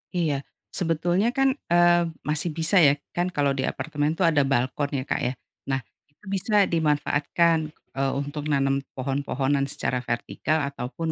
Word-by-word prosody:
Iya 160 -5 +1 0.4
sebetulnya 175 +4 +1
kan, 270 0 +4 0.2
eee, 175 0 +5 0.3
masih 155 +3 0
bisa 165 +4 +3
ya 140 - +5 0.2
kan 175 +1 +1
kalau 140 -1 +2
di 130 - 0
apartemen 150 -1 -1
tuh 190 - +1
ada 145 -3 +3
balkon 135 +2 0
ya - - -3
Kak - - 0
ya 125 - -1 0.3
nah 135 -1 0 0.3
itu 145 - -41
bisa 205 +2 +3
dimanfaatkan, 160 0 +2 0.4
eee, 135 0 +1
untuk 145 +1 -4
nanam 135 -2 +2 0.2
pohon-pohonan 135 +1 0
secara 125 -2 -1
vertikal 125 +5 -1
ataupun 140 +5 -4
145 Hz, 150 wpm, -25 LUFS, 135-170 Hz, 0.4 s, eee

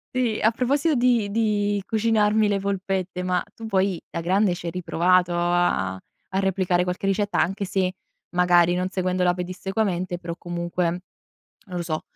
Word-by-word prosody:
Sì, 240 -4 +1
e - - -5
a 220 - +5
proposito 280 +7 +1
di 240 -5 +2
di 205 -2 +1
cucinarmi 220 -1 +2
le 200 -1 +1
polpette, 190 -2 -2
ma 180 -1 0
tu 225 - -8
poi 190 -4 +1
da - - -3
grande 185 +2 +2
ci 175 -1 -6
hai - - -2
riprovato 180 0 +2
a 175 - +1
a 190 - -7
replicare 185 -2 +1
qualche 180 +2 -3
ricetta? 205 +1 0
Anche 195 +3 -1
se 185 -1 0 0.4
magari 175 -1 +4
non 180 +1 -1
seguendola 185 -1 +1
pedissequamente, 185 0 -2
però 170 -1 -5
comunque, 175 0 -3 0.8
non 180 - -6
lo - - -2
so, 155 -2 -3
185 Hz, 165 wpm, -24 LUFS, 175-205 Hz, 0.8 s, a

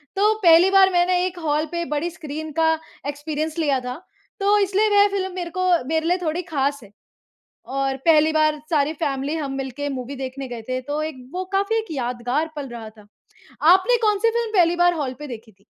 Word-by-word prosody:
तो 415 +2 +3
पहली 345 -1 +6
बार 390 -1 +6
मैंने 355 +1 +2
एक 365 -1 -4
हॉल 305 -1 0
पे 340 0 -2
बड़ी 300 +3 -1
स्क्रीन 310 -1 -7
का 320 +1 +3 0.4
एक्सपीरियंस 305 +2 -4
लिया 285 -4 +1
था। 250 0 -5 0.4
तो 405 +1 +3
इसलिए 405 +2 +2
वह 410 0 +5
फ़िल्म 380 -2 -2
मेरे 350 -2 -4
को 370 - 0 0.2
मेरे 320 +1 0
लिए 355 +2 +2
थोड़ी 325 +1 -1
ख़ास 285 -4 -1
है। 200 - -16 0.8
और 270 -1 0
पहली 315 -1 +5
बार 310 -1 +2
सारी 300 -1 +2
फैमिली 285 -1 -2
हम 285 -4 -3
मिलके 270 +2 -4
मूवी 270 0 -5
देखने 265 0 -6
गए 240 -2 -7
थे 255 0 -1
तो 295 +1 -1
एक 310 -2 -4 0.2
वो 370 +1 -2
काफ़ी 400 +3 +1
एक 445 0 -1
यादगार 250 +2 -2
पल 285 -2 -5
रहा 230 -2 -8
था। 215 -1 -19 0.7
आपने 380 +7 +4
कौन-सी 425 0 +2
फ़िल्म 465 -1 -2
पहली 345 -1 +4
बार 350 0 +4
हॉल 285 -6 -3
पे 295 - -7
देखी 230 -3 -9
थी? 195 0 -31
310 Hz, 200 wpm, -22 LUFS, 275-360 Hz, 0.8 s, पहली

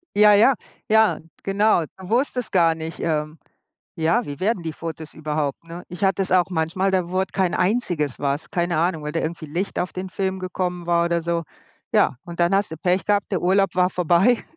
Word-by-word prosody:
Ja, 210 0 +7
ja, 220 +7 +6 0.4
ja, 220 0 +4 0.2
genau. 205 0 +3 0.2
Du 190 0 -10
wusstest 250 0 0
gar 165 -3 +4
nicht, 160 0 -7
ähm 155 -1 -2 0.6
ja, 165 +10 +1
wie 145 +1 -7
werden 195 -1 0
die 160 -1 -4
Fotos 160 -1 -7
überhaupt, 150 -2 -3
ne? 170 +1 -9
Ich 180 +3 -7
hatte 195 -1 +3
das - - -6
auch 185 0 +3
manchmal, 175 +3 0
da 185 -2 0
wurde 190 +1 0
kein 190 -2 0
einziges 180 - 0
was. 140 +2 -2
Keine 175 -3 0
Ahnung, 165 -2 0
weil 150 - -3
da 165 - -1
irgendwie 165 0 -4
Licht 170 +6 -3
auf 180 - -2
den 185 0 -5
Film 190 0 -2
gekommen 180 -1 -3
war 170 0 +3
oder 170 -1 0
so. 170 0 -1 0.5
Ja, - - +3
und 170 0 -9
dann 175 +3 +3
hast 195 -4 0
du 160 - -6
Pech 180 +3 0
gehabt, 205 -1 +1
der 190 - 0
Urlaub 195 +2 +3
war 180 0 +3
vorbei 180 +7 +3
180 Hz, 205 wpm, -22 LUFS, 165-195 Hz, 0.6 s, Ja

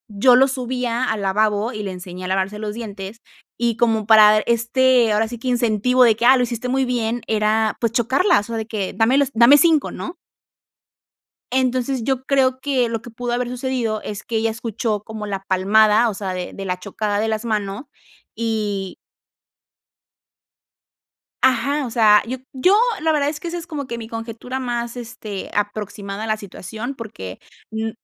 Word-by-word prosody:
yo 245 +5 +6
lo 265 +2 +6
subía 250 -1 -2
al 220 -2 -2
lavabo 210 +3 +1
y 215 - -5
le 200 -2 -4
enseñé 180 0 -8
a - - -3
lavarse 190 +2 -1
los 210 -1 -4
dientes 205 -2 -7 0.4
y 235 -1 0
como 225 -3 +1
para 215 -1 +7
este, 235 +1 +2
ahora 220 +1 +1
sí, 240 -1 -7
que 255 - -6
incentivo 245 0 +2
de 230 -3 +5
que, 235 - 0
ah, 260 +2 +8
lo 250 - +2
hiciste 240 0 -3
muy 265 +1 +1
bien, 240 -1 -1
era, 215 0 +1
pues, 230 -2 0
chocarlas 255 - +3
o - - -4
sea - - -2
de 220 - -3
que 210 -4 -3
dame 225 +6 +3
los 280 -1 +2
dame 235 +5 +7
5, 320 -2 +3
¿no? 345 - -6 1.4
Entonces, 255 0 0
yo 260 +1 -1
creo 260 -2 +2
que, 260 -3 0
lo 225 -1 -3
que 240 - -11
pudo 245 +1 -4
haber 245 0 -1
sucedido, 245 -4 -2
es 210 0 -6
que 230 - -2
ella 225 +1 +1
escuchó 220 -1 -3
como 215 -1 -7
la 195 -1 -4
palmada, 215 +4 +4
o - - -4
sea, 190 -1 -4
de 180 -1 -5
de 195 - -7
la 180 -1 -2
chocada 205 +2 -2
de 220 - 0
las 220 +1 -2
manos 210 0 -2 0.5
y 210 -4 -2 2.5
Ajá, 260 +3 +2
o 240 - -6
sea, 215 -2 +5
yo 255 +3 -4 0.2
yo 320 +9 +3 0.3
la 320 0 +2
verdad 290 -2 +1
es 300 0 -6
que, 340 - -5
esa 350 - -4
es 340 0 -8
como 295 -4 -5
que 235 - -5
mi 225 -1 -7
conjetura 230 +3 -6
más, 240 -1 -3
este, 225 -4 -7
aproximada 205 0 -3
a - - -4
la 215 0 0
situación, 215 +5 -7
porque 205 - -8 0.3
mm 220 0 -2
225 Hz, 190 wpm, -21 LUFS, 210-250 Hz, 2.5 s, ah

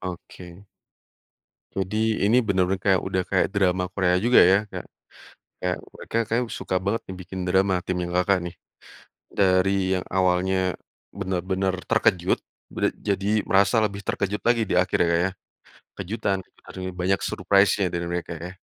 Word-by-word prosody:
Oke. 90 +1 -9 1.1
Jadi 110 +3 -1
ini 110 +4 +4
bener-bener 95 -1 +1
kayak 95 -2 +4
udah 95 -1 0
kayak 95 - +2
drama 90 -2 +2
Korea 90 -2 +1
juga 120 +2 +6
ya. 95 - +5
Kayak - - -7 0.8
kayak 90 0 0 0.2
mereka 115 - -5
kayaknya 120 +2 0
suka 95 - -4
banget 110 +3 0
nih 95 - -6
bikin 95 +1 -8
drama 95 +1 +2
timnya 90 -1 -2
Kakak, 90 +2 +2
nih. 85 - -16 0.8
Dari 95 0 +4 0.3
yang - - -6
awalnya 95 0 +1 0.6
benar-benar 95 0 -2 0.2
terkejut 95 -5 +2 0.3
bera - - -1
jadi 100 +1 0
merasa 100 +4 +4
lebih 100 -1 -2
terkejut 100 +1 -2
lagi 120 -1 +3
di - - +1
akhir 90 0 +1
ya, - - +1
Kak, 85 - +2
ya. 95 - -2 0.7
Kejutan 95 0 -2 0.3
akhirnya 95 0 -6
banyak 95 +2 +1
surprise-nya 100 +1 +2
dari 85 0 -2
mereka 85 0 -3
ya. 90 +3 -7
95 Hz, 150 wpm, -24 LUFS, 90-100 Hz, 1.1 s, juga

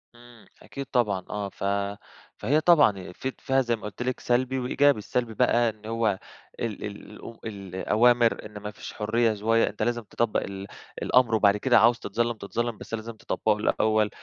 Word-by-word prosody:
إمم، 120 -1 -17 0.2
أكيد 140 - -7
طبعًا 105 -9 0
آه 105 -1 -3
ف - - -10 0.7
فهي 145 +8 +1
طبعًا 145 - +4
في 130 +8 -4
ت - - -29
فيها 135 0 +2
زي 120 -2 0
ما 110 - -15
قُلت 105 +3 -7
لِك 125 0 -2
سلبي 130 +2 0
وإيجابي، 140 +2 +3
السلبي 115 +2 -2
بقى 120 0 +3
إن 110 -1 -11
هُو 110 -3 0 0.4
ال 115 -3 -4
ال 105 +1 -8
أم 115 - -9
الأوامر 110 +4 +1
إن 105 -1 -9
ما 105 0 -6
فيش 110 +1 -9
حُرية 115 +1 +1
شوية 115 +2 +2
أنت 105 - -4
لازم 120 -1 -1
تطَبّق 115 +1 0
ال 100 0 -7 0.3
الأمر، 125 -3 +3
وبعد 105 -2 +4
كده - - +4
عاوز 115 +2 +4
تتظلّم، 120 +4 -1
تتظلّم 115 +3 -3
بس - - -11
لازم 115 +1 -4
تطبّقه 110 -1 -1
الأول، 110 0 +2
115 Hz, 180 wpm, -26 LUFS, 105-120 Hz, 0.7 s, طبعًا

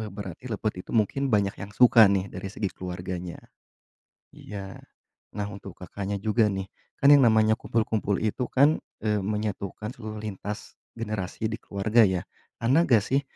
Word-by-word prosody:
be 110 - -4
berarti 100 +2 -8
lepet 105 -3 -2
itu - - -10
mungkin 125 +6 +1
banyak 100 -1 +2
yang 100 +1 -8
suka 120 -3 +7
nih, 100 -1 0
dari 95 +1 -6
segi 100 -1 -3
keluarganya. 90 -1 -5 1.0
Iya. 100 -2 -8 0.6
Nah, 100 0 -2
untuk 100 -2 -10
Kakaknya 100 +2 -4
juga 110 +1 +2
nih, 95 -1 -3 0.3
kan 140 - +4
yang 140 -2 +7
namanya 110 -1 +4
kumpul-kumpul 110 -3 0
itu 110 +3 -2
kan, 145 +4 +4 0.2
eee, 105 -2 +1
menyatukan 105 +1 -3
seluruh 110 -3 -7
lintas 105 -1 -6 0.2
generasi 110 -2 -4
di 110 - -3
keluarga, 105 +4 +2
ya. 95 -4 +2 0.4
Anda 135 +9 +4
nggak 115 -5 +5
sih, 135 +2 +1
105 Hz, 155 wpm, -26 LUFS, 95-110 Hz, 1.0 s, suka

